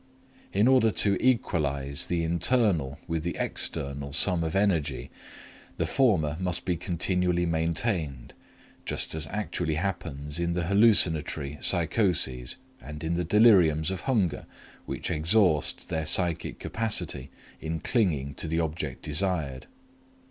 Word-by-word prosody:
In 105 +4 +3
order 130 -4 +5
to 100 +1 +2
equalize 70 - 0
the 85 -1 -1
internal 85 - +1
with 80 -2 -2
the 85 +2 -3
external 70 0 -2
sum 90 +1 +2
of 80 +1 -3
energy, 80 -10 0 0.7
the - - 0
former 85 - +1
must 90 -1 -2
be 90 - 0
continually 90 0 0
maintained, 80 - -2 0.5
just - - -2
as 80 -1 -3
actually 90 -5 -2
happens 80 -4 -4
in 85 0 0
the 90 0 -1
hallucinatory 80 -7 +3
psychoses 85 - 0 0.3
and 75 +1 -9
in 80 +1 -1
the 85 +1 0
deliriums 90 -5 +4
of 95 - -4
hunger 105 - 0 0.4
which - - -4
exhaust 80 -1 +2
their 80 -2 -2
psychic 85 0 +1
capacity 90 - -2 0.3
in 80 0 -4
clinging 80 - 0
to 80 - -4
the 80 +1 -1
object 80 -4 -3
desired. 75 -4 -1
85 Hz, 125 wpm, -27 LUFS, 75-95 Hz, 0.7 s, order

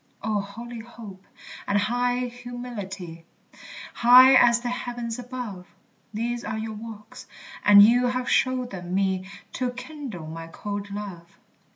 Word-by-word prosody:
O 215 -1 0
holy 230 +4 -9
hope! 220 -4 -12 0.4
and 200 - +2
high 245 +4 0
humility, 240 -9 -7 0.7
High 250 +2 +8
as 240 -2 +6
the 245 - -3
heavens 240 -1 -4
above! 240 -7 -7 0.4
These 235 +2 -3
are 220 0 -4
your 220 0 -4
walks, 215 0 -10 0.4
and 205 0 +9
you 245 +3 +5
have 255 0 -2
showed 255 -1 +1
them 180 -1 -5
me 190 -1 0 0.2
To 255 -1 -1
kindle 250 - -8
my 165 +1 -7
cold 205 +4 -6
love. 195 -4 -8
225 Hz, 135 wpm, -25 LUFS, 200-245 Hz, 0.7 s, and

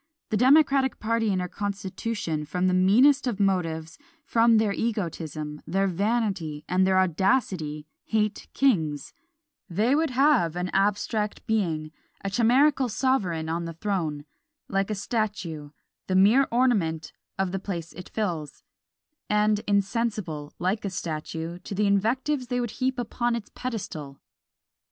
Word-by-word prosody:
The 215 - +2
democratic 270 +1 +4
party 225 -1 0
in 185 - 0
our 180 - -2
constitution, 200 -3 -3
from 180 +5 -2
the 185 - +3
meanest 250 +10 +5
of 220 -5 -2
motives, 165 - -1 0.3
from 230 -3 +4
their 215 -2 +2
egotism, 160 -9 -3
their 195 +4 +1
vanity, 195 -5 -1
and 185 +1 +2
their 190 0 +3
audacity, 185 - +1 0.2
hate 215 -1 -1
kings; 160 - +1 0.6
they 215 +9 +2
would 315 +2 +2
have 255 - +3
an 180 +1 -2
abstract 210 +2 0
being, 165 -8 -1 0.3
a 195 - -1
chimerical 255 +5 +3
sovereign 205 -10 0
on 170 +1 -2
the 165 -1 -6
throne 165 -7 -2 0.4
like 195 0 0
a 215 - -1
statue, 195 - -3 0.4
the 185 - 0
mere 215 +9 +5
ornament 210 -11 +1 0.2
of 190 -1 0
the 195 - -2
place 175 -4 -5
it 180 - -10
fills, 170 -9 -3 0.7
and 210 0 +3
insensible, 200 -7 -1
like 185 +5 -1
a 200 - -1
statue, 165 -1 -5
to 195 - -7
the 210 +2 +1
invectives 245 +7 +1
they 245 +1 -1
would 240 -3 -2
heap 260 -1 0 0.2
on 240 0 +3
its 230 -3 -7
pedestal! 160 - -5
200 Hz, 140 wpm, -26 LUFS, 170-230 Hz, 0.7 s, meanest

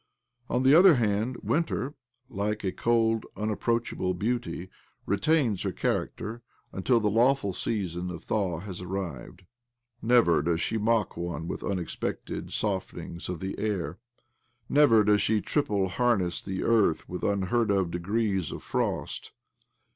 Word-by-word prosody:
On 125 - +1
the 135 +2 +6
other 175 +1 +8
hand. 115 +1 0
Winter, 150 -4 0 0.3
like 105 +2 -2
a 95 - 0
cold, 115 0 +1
unapproachable 105 -3 -1
beauty, 115 -2 -2 0.4
retains 115 - +2
her - - -1
character 115 +3 -2 0.3
until 115 +6 +2
the 105 - 0
lawJ'ul 115 -1 +3
season 90 -4 -2
of 85 -2 -7
thaw 95 -6 -1
has 95 -2 -7
arrived.. 90 -2 -5 0.6
Never 115 -9 +4
does 85 +2 0
she 110 - -1
mock 110 -1 +1
one 85 -2 -4
with - - -4
unexpected 90 -4 -3
softenings 95 -4 -3
of 90 -3 -4
the 95 +1 -3
air; 95 -5 -2 0.7
never 130 -7 +5
does 105 0 +4
she 110 0 +2
triple 105 -8 0
harness 95 -3 +1
the 95 -1 -4
earth 105 -9 +2
with 90 - -5
unheard 100 +3 +1
of 95 -4 +1
degrees 95 0 -1
of - - -7
frost. - - -2
105 Hz, 135 wpm, -28 LUFS, 90-115 Hz, 0.7 s, other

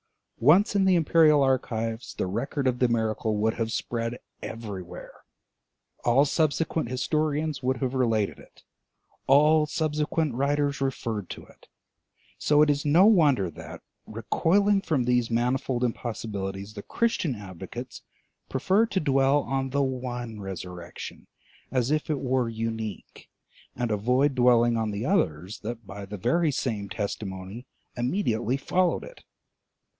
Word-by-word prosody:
Once 180 - +5
in 195 -1 +3
the 190 -1 +4
imperial 155 -3 +5
archives, 115 -3 -1
the - - -1
record 120 +9 -2
of 125 -1 +1
the 125 - +4
miracle 110 -2 0
would 110 +2 +1
have 115 -1 -2
spread 115 +1 -3 0.2
everywhere; 100 -6 -7 0.9
all 125 +4 +4
subsequent 155 -2 0
historians 150 +3 -1
would 130 0 0
have 130 +1 -2
related 115 -6 0
it, - - -18 0.6
all 150 +3 +5
subsequent 155 -1 -1
writers 140 +2 0
referred 115 -7 -2
to - - -8
it. - - -21 0.7
So 150 0 +4
it 150 - +4
is 145 0 -1
no 160 +6 +5
wonder 145 - +4
that, - - -10 0.2
recoiling 195 - +2
from 150 -9 0
these 125 -1 +1
manifold 125 +1 0
impossibilities, 105 -4 -4
the 105 - -7
Christian 180 - -1
advocates 95 -5 -8 0.5
prefer 190 - +2
to 195 - -1
dwell 135 -2 +3
on 135 0 -2
the 140 +1 +1
one 125 -4 -4
resurrection 90 -2 -8 0.4
as 130 +1 0
if 155 +1 0
it 150 -3 0
were 130 -2 0
unique, 110 -2 -5 0.5
and 120 -2 -2
avoid 125 +7 +2
dwelling 120 -2 +4
on 110 -1 -1
the 105 +3 -3
others 95 - 0
that 115 +1 -6
by 100 +1 -8
the 105 +1 -6
very 165 - +2
same 110 -7 -3
testimony 100 +2 -5 0.3
immediately 120 - 0
followed 180 +5 +1
it. - - -12
125 Hz, 135 wpm, -26 LUFS, 110-150 Hz, 0.9 s, Once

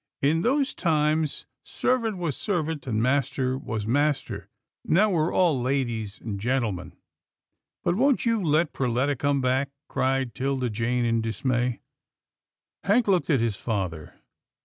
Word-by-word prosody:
In 155 +4 +3
those 270 +6 +1
times, 155 -2 0 0.2
servant 230 -5 0
was 170 -6 -2
servant, 160 - -2
and 110 -2 0
master 130 0 +1
was 110 -5 -4
master. 145 +4 0 0.3
Now 205 +5 +3
we're 165 -2 +1
all 165 -8 +2
ladies 120 -5 -2
and 105 -3 -5
gentlemen." 110 -6 -1 0.5
" - - -60
But 175 - +2
won't 260 +7 +2
you 230 -2 +2
let 155 0 +2
Perletta 130 +3 0
come 140 +2 +1
back? 130 +2 +1
" - - -64
cried 130 -2 0
'Tilda 130 -2 -1
Jane 120 +3 0
in 115 -1 +1
dismay. 120 +2 -1 1.0
Hank 220 +4 +3
looked 185 -3 +2
at 135 -7 +3
his 115 -4 0
father. 90 -9 -3
135 Hz, 145 wpm, -26 LUFS, 120-160 Hz, 1.0 s, In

